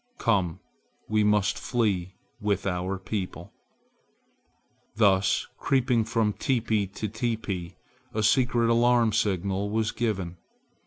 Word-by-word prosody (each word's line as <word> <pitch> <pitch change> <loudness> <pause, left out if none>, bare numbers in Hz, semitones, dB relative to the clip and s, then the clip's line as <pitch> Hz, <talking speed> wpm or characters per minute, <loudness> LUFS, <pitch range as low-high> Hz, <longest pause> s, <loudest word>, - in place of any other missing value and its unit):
Come, 95 -7 0 0.5
we 110 -1 +2
must 105 -2 +2
flee 95 -7 -1 0.2
with 105 -3 -1
our 95 0 -1
people." 95 0 -5 1.4
Thus 100 -3 +3
creeping 125 -4 +2
from 110 -2 +1
teepee 110 -6 0
to 100 +3 -5
teepee 105 -5 -3 0.4
a 110 - -1
secret 120 0 +3
alarm 120 -1 +4
signal 100 0 0
was 110 +1 0
given. 95 -7 -2
105 Hz, 105 wpm, -27 LUFS, 95-115 Hz, 1.4 s, alarm